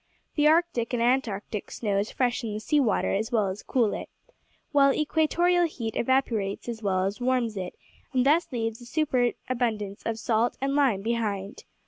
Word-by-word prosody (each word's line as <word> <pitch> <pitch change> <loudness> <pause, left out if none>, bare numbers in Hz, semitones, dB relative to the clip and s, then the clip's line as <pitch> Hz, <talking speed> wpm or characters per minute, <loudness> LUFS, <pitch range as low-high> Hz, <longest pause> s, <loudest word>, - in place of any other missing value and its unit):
The 295 -1 +3
Arctic 315 -7 +2
and 235 -1 +1
Antarctic 225 -5 -1
snows 205 -1 -1
freshen 240 -4 -1
the - - -3
sea 295 +7 +1
water 235 -7 +1
as 220 +5 -1
well 215 -5 +2
as 190 +2 -5
cool 235 -5 +1
it, - - -6 0.6
while 280 -2 +5
equatorial 340 +4 +2
heat 230 -8 -5
evaporates 230 -6 0
as 230 -2 -5
well 190 -3 +1
as 200 +5 -3
warms 245 -3 +1
it, 185 -2 -5 0.4
and 255 -1 +2
thus 310 +4 +3
leaves 225 -1 -3
a 240 - -11
superabundance 245 -7 -1
of 225 -1 -2
salt 225 +1 0
and 275 +1 -1
lime 255 -9 +2
behind. 210 -4 -2
235 Hz, 165 wpm, -27 LUFS, 210-270 Hz, 0.6 s, while